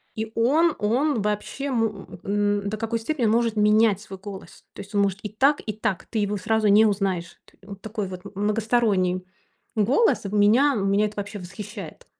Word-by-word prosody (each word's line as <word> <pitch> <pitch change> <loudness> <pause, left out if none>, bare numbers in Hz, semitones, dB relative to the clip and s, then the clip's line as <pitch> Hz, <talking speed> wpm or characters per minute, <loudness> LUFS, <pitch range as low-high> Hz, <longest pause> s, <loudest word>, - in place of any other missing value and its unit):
И 220 0 -4
он 300 +9 +3
он 240 +4 +1
вообще 210 +7 -3
мо 225 -5 -1 0.2
м, 205 0 0
н 200 - -3
до 215 - -4
какой 225 +1 -2
степени 255 +1 -1
он 215 - +3
может 230 -1 +1
менять 210 -1 +4
свой 195 -3 -10
голос. 195 -1 -10
То - - -8
есть 200 +2 -13
он 200 - +4
может 195 -1 0
и 210 - -4
так, 270 +8 +2
и 215 - -3
так. 205 -3 -2
Ты 220 - -3
его 205 0 0
сразу 215 +2 +1
не 210 +2 +6
узнаешь. 195 -4 -1
Т - - -24
он 200 - -7
такой 210 0 -5
вот 185 -1 -8
многосторонний 205 -3 +1 0.5
голос. 245 - +2
В 200 - -5
меня 230 +8 +4
меня 200 +1 +2
это 210 - -10
вообще 205 +1 -5
восхищает. 190 -1 -9
210 Hz, 195 wpm, -24 LUFS, 200-225 Hz, 0.5 s, не